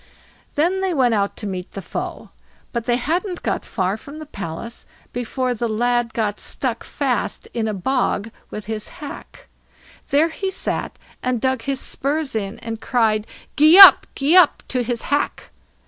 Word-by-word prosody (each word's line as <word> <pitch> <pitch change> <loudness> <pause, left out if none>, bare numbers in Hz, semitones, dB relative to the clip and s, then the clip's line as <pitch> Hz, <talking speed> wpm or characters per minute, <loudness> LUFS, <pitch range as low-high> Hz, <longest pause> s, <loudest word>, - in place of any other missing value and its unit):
Then 355 +6 +1
they 375 -3 0
went 250 -4 +3
out 200 -2 0
to - - -6
meet 185 -2 -5
the - - -5
foe; - - -6 0.4
but 235 -2 -2
they 240 -1 +2
hadn't 345 - -2
got - - -1
far 190 0 -2
from 285 +6 -11
the 310 - -8
palace 200 - -7 0.3
before 250 +1 -2
the 235 0 -2
lad 240 +1 0
got 210 -3 -1
stuck 245 -4 -1
fast 270 -4 -2
in 225 -2 -1
a 215 - -1
bog 225 0 -1 0.2
with 210 - -7
his 220 -1 -4
hack. 290 -2 -10 0.6
There 300 +4 +3
he 385 +4 -3
sat 380 - -3 0.2
and 250 -2 -1
dug 260 0 0
his 275 +1 -2
spurs 285 +1 -2
in, 200 -1 -3
and 225 -1 -5
cried, 220 -3 +1 0.3
"Gee 310 +4 +7
up, 395 - +11
gee 285 +5 +2
up!" 360 -5 +5
to 255 - 0
his 240 -1 -3
hack. 290 +1 -2
245 Hz, 170 wpm, -21 LUFS, 220-285 Hz, 0.6 s, up